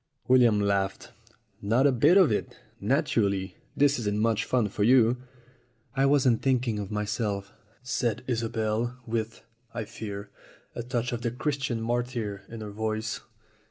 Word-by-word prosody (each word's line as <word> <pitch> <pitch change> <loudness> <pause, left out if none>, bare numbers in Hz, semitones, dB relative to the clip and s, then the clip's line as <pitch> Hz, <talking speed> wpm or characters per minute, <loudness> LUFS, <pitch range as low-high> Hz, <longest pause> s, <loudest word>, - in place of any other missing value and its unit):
William 120 -4 +5
laughed. 100 -1 -1 0.5
"Not 115 +7 +2
a 140 - +6
bit 135 +9 +5
of 185 - +6
it. 105 - -2 0.2
Naturally, 105 - 0 0.2
this 145 -1 +4
isn't 105 -2 -1
much 115 0 +1
fun 120 -4 +1
for 100 +1 -2
you." 120 +1 +5 0.8
"I 135 0 +3
wasn't 135 -5 +3
thinking 125 -5 +1
of 100 -2 -5
myself," 105 -1 -2 0.3
said 120 -4 -1
Isobel, 115 0 -1
with, 115 -1 -3 0.3
I 115 -2 -3
fear, 100 -2 -7 0.4
a - - -4
touch 120 0 -2
of 120 -1 -3
the 120 - 0
Christian 135 -1 -2
martyr 120 -3 -2
in 115 -1 -8
her 105 -1 -6
voice. 110 +1 -3
115 Hz, 145 wpm, -27 LUFS, 105-125 Hz, 0.8 s, a